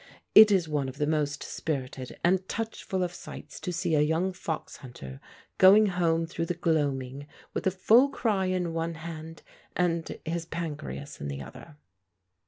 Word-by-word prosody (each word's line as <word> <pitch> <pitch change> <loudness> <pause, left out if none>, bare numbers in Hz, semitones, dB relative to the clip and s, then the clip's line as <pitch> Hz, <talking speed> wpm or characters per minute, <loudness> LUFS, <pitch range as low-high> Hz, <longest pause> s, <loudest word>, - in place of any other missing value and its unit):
It 215 0 +10
is 190 -5 +2
one 145 -3 -1
of 130 - -10
the 150 - +1
most 150 -1 -1
spirited 130 -4 -4
and 185 +2 +4
touchful 220 -4 -3
of 175 -1 -3
sights - - -9
to 180 - -4
see 175 -1 -1
a 150 - +4
young 165 +5 +1
fox 165 -4 -5
hunter 70 - -10 0.4
going 200 +3 +8
home 170 -4 +1
through 165 0 -4
the 175 - -1
gloaming 145 -5 -1 0.3
with - - -1
a - - +6
full 225 +8 +5
cry 210 -8 0
in 180 -2 -1
one 165 0 -2
hand 160 0 -8 0.3
and 170 -2 0
his 165 0 -3
pancreas 155 -3 -6
in 70 - -3
the 70 0 -5
other. 75 - -12
165 Hz, 170 wpm, -28 LUFS, 145-185 Hz, 0.4 s, It